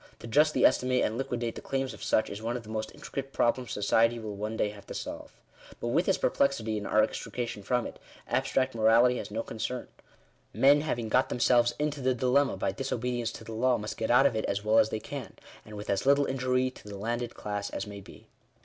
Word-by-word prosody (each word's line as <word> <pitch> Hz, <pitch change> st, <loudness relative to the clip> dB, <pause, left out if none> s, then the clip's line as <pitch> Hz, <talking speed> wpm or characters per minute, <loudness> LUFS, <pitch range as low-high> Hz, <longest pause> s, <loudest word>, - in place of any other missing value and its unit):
To -, -, -11 dB
justly 150 Hz, +6 st, +3 dB
estimate 125 Hz, 0 st, +3 dB
and 110 Hz, -, 0 dB
liquidate 120 Hz, -2 st, -2 dB
the -, -, -8 dB
claims 135 Hz, -2 st, -2 dB
of -, -, -12 dB
such, 110 Hz, -, +1 dB
is 100 Hz, +2 st, -6 dB
one 120 Hz, +2 st, -2 dB
of 120 Hz, -, -8 dB
the 105 Hz, -, -13 dB
most 110 Hz, 0 st, -3 dB
intricate 135 Hz, 0 st, -6 dB
problems 120 Hz, -1 st, 0 dB
society 115 Hz, +3 st, +2 dB
will 110 Hz, -3 st, -6 dB
one 105 Hz, +2 st, -4 dB
day 105 Hz, -, +1 dB
have 105 Hz, -1 st, -12 dB
to -, -, -7 dB
solve. -, -, -6 dB, 0.5 s
But -, -, -3 dB
with -, -, +1 dB
this -, -, +3 dB
perplexity 115 Hz, -6 st, +1 dB
and 100 Hz, -, -6 dB
our 110 Hz, -, +4 dB
extrication 120 Hz, -4 st, -4 dB
from 125 Hz, +4 st, 0 dB
it, -, -, -8 dB, 0.3 s
abstract 130 Hz, 0 st, 0 dB
morality 115 Hz, +2 st, +4 dB
has -, -, -6 dB
no 110 Hz, +2 st, -3 dB
concern. 125 Hz, +3 st, -4 dB, 0.7 s
Men 145 Hz, +2 st, +6 dB
having 120 Hz, -7 st, -2 dB
got 130 Hz, +5 st, +2 dB
themselves 120 Hz, 0 st, +3 dB
into 150 Hz, -1 st, -2 dB
the 130 Hz, 0 st, +1 dB
dilemma 130 Hz, -2 st, +2 dB
by 95 Hz, -, 0 dB
disobedience 120 Hz, 0 st, -2 dB
to -, -, -9 dB
the 115 Hz, -, -8 dB
law, 125 Hz, +2 st, +2 dB
must 105 Hz, +1 st, -5 dB
get 110 Hz, -, -3 dB
out 125 Hz, +3 st, +6 dB
of 120 Hz, -, +3 dB
it 110 Hz, -, -1 dB
as 100 Hz, +1 st, -2 dB
well 110 Hz, +1 st, +5 dB
as 110 Hz, -1 st, +4 dB
they 110 Hz, -, -3 dB
can; -, -, -7 dB, 0.3 s
and 105 Hz, -, -11 dB
with 105 Hz, -, -7 dB
as 100 Hz, -1 st, 0 dB
little 140 Hz, 0 st, +5 dB
injury 130 Hz, -1 st, 0 dB
to 115 Hz, -, -15 dB
the 100 Hz, -1 st, -7 dB
landed 120 Hz, +3 st, -3 dB
class 100 Hz, -1 st, -4 dB
as 95 Hz, -, -4 dB
may 100 Hz, -1 st, -8 dB
be. -, -, -15 dB
120 Hz, 230 wpm, -29 LUFS, 110-130 Hz, 0.7 s, Men